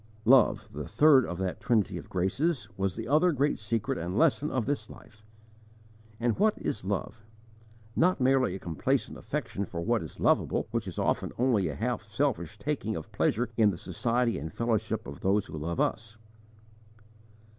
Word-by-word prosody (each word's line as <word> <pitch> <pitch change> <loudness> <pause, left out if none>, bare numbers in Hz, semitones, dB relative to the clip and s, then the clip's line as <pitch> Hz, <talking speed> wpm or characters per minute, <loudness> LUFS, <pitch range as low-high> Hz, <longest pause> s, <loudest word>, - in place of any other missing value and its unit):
Love, 110 -4 +5
the - - -5
third 135 +3 +5
of 90 - -4
that 95 0 -3
trinity 100 -6 +1
of 85 - -8
graces, 105 - 0
was 95 -1 -1
the 115 0 -5
other 155 +7 +4
great 145 0 0
secret 110 -4 -2
and 90 +4 -3
lesson 150 -1 +3
of 130 -4 -1
this 140 -6 -2
life. 110 -1 -15 1.0
And 120 +3 0
what 215 +1 +4
is 105 - -3
love? 100 +3 -3 0.7
Not 180 +1 +3
merely 130 -6 +3
a - - -6
complacent 85 -4 -1
affection 100 - -4
for 85 -3 -5
what 85 - +1
is - - -9
lovable, - - +2
which 115 -4 -2
is 90 - -6
often - - 0
only 120 -7 +2
a 75 - -4
half - - -3
selfish - - -1
taking - - -2
of - - -7
pleasure 120 +3 +1
in 110 -2 +5
the 95 - -3
society 115 +7 0
and 80 +2 -6
fellowship 110 0 -1
of - - -8
those 100 +2 +1
who - - -9
love 80 +2 -3
us. 110 0 -1
110 Hz, 175 wpm, -29 LUFS, 95-125 Hz, 1.0 s, Love